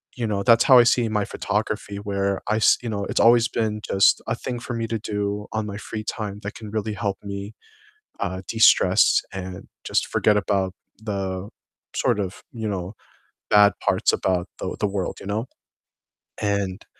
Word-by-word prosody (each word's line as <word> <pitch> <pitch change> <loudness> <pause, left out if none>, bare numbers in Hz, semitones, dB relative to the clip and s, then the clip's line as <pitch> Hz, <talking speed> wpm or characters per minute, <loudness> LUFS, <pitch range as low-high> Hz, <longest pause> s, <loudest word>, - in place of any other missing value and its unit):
you 120 -3 -2
know, 100 -2 -1
that's 115 +1 +5
how 130 - +8
I - - +8
see 120 -1 +3
my 105 -1 0
photography, 105 -1 -3
where 100 -1 -1
I 110 - +1
s 110 - +5
you 120 - -3
know, 100 -2 -2
it's - - -1
always 120 0 +6
been 110 -2 -2
just 95 -1 +3
a - - 0
thing 125 -1 -5
for 120 - -6
me 115 0 -2
to 115 0 -2
do 105 -1 -3
on 110 -1 -1
my 100 -1 -6
free 110 0 -6
time 105 -2 -4
that 100 - -5
can 110 -2 -9
really 110 0 -2
help 100 -1 -2
me, 100 +1 -6 0.7
uh, 95 -1 -3
de-stress 110 +3 +5
and 95 -1 -7 0.2
just - - 0
forget 105 -1 +2
about 95 -2 0 0.3
the 95 -2 -3 0.5
sort 105 - +1
of, 95 -1 -5
you 110 -3 -4
know, 95 0 -4 0.6
bad 105 -1 +7
parts - - +2
about 90 -2 0
the - - -4
the 105 - +2
world, 100 -2 -3
you - - -10
know? 105 +4 -2 1.0
And, 100 -2 -1
105 Hz, 185 wpm, -23 LUFS, 100-110 Hz, 1.0 s, how